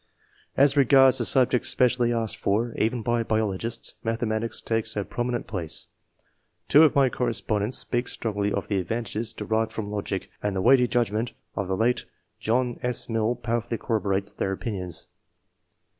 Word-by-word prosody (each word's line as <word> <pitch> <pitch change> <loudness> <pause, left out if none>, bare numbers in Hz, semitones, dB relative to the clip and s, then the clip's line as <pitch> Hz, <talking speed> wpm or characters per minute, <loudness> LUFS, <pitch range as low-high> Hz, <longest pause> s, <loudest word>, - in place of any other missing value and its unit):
As 140 +1 +5
regards 135 -1 +6
the - - +1
subjects 130 -2 +3
specially 125 -1 +2
asked 115 -2 -2
for, 115 +4 0
even 115 +1 0
by 120 +1 +1
biologists, 110 +1 -2
mathematics 115 -1 -2
take 115 -1 -1
a 100 -2 -2
prominent 120 0 -2
place. 85 -7 -5 0.8
Two 150 - +7
of 160 - +5
my 140 -1 +5
correspondents 115 -2 -1
speak 120 0 -1
strongly 105 -2 -2
of - - -2
the 100 -2 0
advantages 110 +3 -3
derived 110 0 -1
from 105 -2 -5
logic, 100 -2 -4
and 105 -1 -1
the 95 - 0
weighty 125 0 +5
judgment 115 -1 0 0.2
of 100 -3 -2
the 95 0 -1
late 120 +2 +1 0.3
John 120 +2 0
S. 125 -1 -1
Mill 115 +1 +1
powerfully 115 0 -2
corroborates 100 -4 -1
their 95 - -2
opinions. 95 -5 -5
115 Hz, 155 wpm, -25 LUFS, 105-120 Hz, 0.8 s, Two